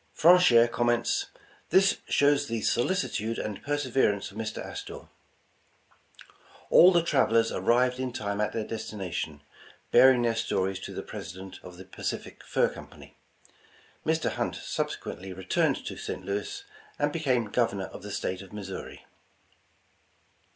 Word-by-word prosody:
Franehere 165 -9 +7
comments: 120 0 0 0.4
"This 195 +1 +4
shows 145 0 +3
the 115 -1 -2
solicitude 120 - 0
and 105 -2 -4
perseverence 130 -9 0
of 100 - -13
Mr. 110 -1 -4
Astor." - - -7 1.7
All 180 - +9
the 170 -2 +3
travelers 115 -7 +3
arrived 125 +1 +2
in 130 -1 -2
time 100 -3 -3
at 105 - 0
their 110 -1 -3
destination, 90 -9 -5 0.5
bearing 125 0 +6
their 115 -1 +2
stories 95 -4 -1
to - - -7
the - - -4
President 95 +1 -8
of 90 -1 -12
the 95 - -11
Pacific 95 - -6
Fur - - +2
Company. - - -13 0.9
Mr. 160 0 0
Hunt - - -2
subsequently 95 0 -4
returned 95 0 0
to - - -5
St. - - -6
Louis, 105 - -4 0.3
and - - 0
be 165 - -2
came 130 -6 +1
Governor 110 -6 0
of - - -10
the 105 - -8
State 95 -2 -3
of 95 - -13
Missouri. 100 -2 -8
115 Hz, 135 wpm, -28 LUFS, 100-130 Hz, 1.7 s, All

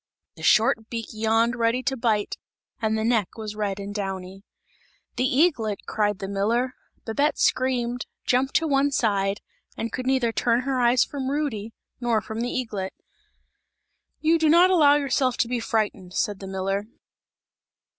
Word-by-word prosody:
The - - -13
short 220 0 +3
beak 230 -2 -5
yawned 225 +2 +2
ready 235 +1 +1
to 265 - 0
bite 225 -4 0 0.4
and 220 0 +1
the 220 - -1
neck 225 -4 0
was 215 -1 -6
red 205 -2 -2
and 200 0 -6
downy. 195 -2 -5 0.7
"The 255 - +1
eaglet!" 255 - +1
cried 210 -2 0
the 195 - -5
miller. 225 +6 0 0.3
Babette 285 +7 +1
screamed, 245 -1 0 0.2
jumped 260 +2 +1
to 325 - +3
one 280 -1 +3
side 200 -6 0 0.4
and 230 - -3
could 255 - -4
neither 260 -3 +2
turn 235 +1 +1
her 260 -1 -1
eyes 240 +1 +4
from 270 -2 -4
Rudy, 265 -7 -3 0.2
nor 240 -3 +1
from 220 +1 -5
the 245 - -1
eaglet. 210 -7 -3 1.3
"You 325 +1 +3
do 315 -1 +3
not 350 +4 +6
allow 295 -5 +6
yourself 270 -3 +1
to 235 - +1
be 245 0 -1
frightened!" 210 -5 -2
said 205 -2 -1
the 195 - -8
miller. 195 +2 -2
230 Hz, 160 wpm, -25 LUFS, 210-255 Hz, 1.3 s, not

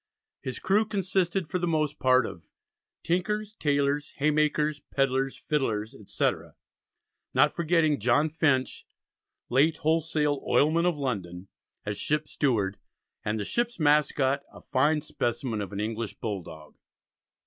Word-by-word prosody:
His 130 -2 -4
crew 205 +3 +2
consisted 190 -3 0
for 180 +3 -2
the 175 - -1
most 155 -2 0
part 130 -1 +4
of 85 - -9 0.5
"Tinkers, 210 +5 -1
Taylors, 145 -4 0
Hay 150 +2 +2
makers, 150 0 +1
Pedlers, 135 0 0
Fiddlers, 115 -7 -1
etc.," 105 - -2 0.8
not 145 +3 +5
forgetting 165 -3 +2
John 120 +8 +3
Finch 145 -5 0 0.6
"late 145 +6 +3
wholesale 155 -2 +1
oilman 165 +4 +3
of 175 -4 0
London," 95 -9 -4 0.4
as 105 -1 -3
ship's 150 0 -1
steward, 105 -9 0 0.4
and 105 +1 -1
the 100 - -3
ship's 240 -3 -1
mascot, 145 -2 +3
a - - -13
fine 150 +4 +1
specimen 120 -5 -2
of 100 - -5
an 100 - -5
English 110 +1 -3
bull 105 -4 -4
dog. 80 -3 -12
145 Hz, 135 wpm, -27 LUFS, 120-160 Hz, 0.8 s, not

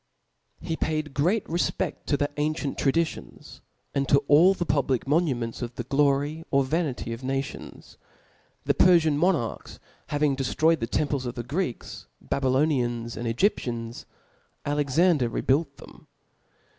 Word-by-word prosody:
He 165 - -3
paid 155 -1 -1
a - - -11
great 175 +10 +1
rcfpeft 170 +2 -2
to 145 - +2
the 145 +1 0
ancipnt 150 -1 -2
traditions, 160 +4 -2 0.3
and 140 -1 -1
to 140 0 +4
all 175 +7 +6
the 175 - -2
public 135 -5 0
monuments 135 -7 0
of 120 0 -5
the 120 - -4
glory 145 +4 +1
or 140 0 +3
vanity 135 -5 -2
of 115 +3 -8
nations. 135 +1 -5 0.7
The - - +3
Perlian 160 -5 +4
nrjonarchs 165 -9 -1 0.3
having 145 -1 +1
deftroycd 155 +5 +1
the 115 - -2
temples 140 -1 -1
of 120 - -5
the 120 - -4
Greeks, 145 0 -4
Babylonians, 130 -4 0
0 - - -7
S*if?» - - -4
^nd - - 0
Egyptians, 120 - -1 0.6
Alexander 145 -1 +2
rebuilt 140 +4 0
then? - - -15
140 Hz, 145 wpm, -26 LUFS, 130-155 Hz, 0.7 s, all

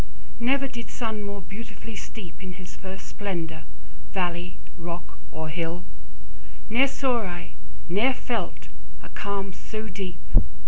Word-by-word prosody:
Never 275 +3 +5
did 235 -3 -4
sun 220 -3 0
more 200 -1 -2
beautifully 220 +3 -5
steep 200 -3 -5
In 185 -1 -3
his 180 0 -8
first 190 0 -6
splendour, 170 -6 -1 0.5
valley, 180 -1 +1 0.2
rock, 175 0 -4
or 160 +1 -1
hill; 165 +2 0 0.8
10 225 - +2
Ne'er 275 - +11
saw 260 -3 +4
I, 175 -3 -3 0.3
never 220 +9 +6
felt, 235 -2 0 0.3
a - - -7
calm 200 -1 0
so 215 +4 -3
deep! 185 -3 -2
195 Hz, 135 wpm, -30 LUFS, 175-225 Hz, 0.8 s, Ne'er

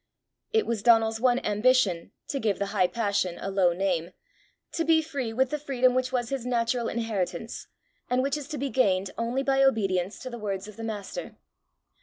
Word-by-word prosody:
It 445 -1 +2
was 230 -3 -2
Donal's 225 -1 +4
one 250 -1 +4
ambition 210 -5 +2 0.2
to 275 - -1
give 215 -5 0
the 200 - -1
high 185 -3 +3
passion 200 -5 -1
a 195 - -4
low 190 -2 +3
name 175 -1 -1 0.6
to 330 - -1
be 325 0 +4
free 285 -7 -3
with 255 +3 +1
the 300 - -1
freedom 255 -3 +2
which 255 0 0
was 245 -2 -1
his 275 -3 -3
natural 240 -1 0
inheritance, 225 -2 -3 0.4
and 250 +1 +2
which 275 +1 0
is 295 -2 -5
to 305 -1 -5
be 275 -1 -2
gained 195 -7 +2
only 240 +4 -1
by 270 0 +2
obedience 195 -8 +2
to 255 - -6
the 240 - -6
words 200 -2 -3
of 215 - -11
the 225 - -8
Master. 220 - -5
230 Hz, 195 wpm, -27 LUFS, 200-260 Hz, 0.6 s, Donal's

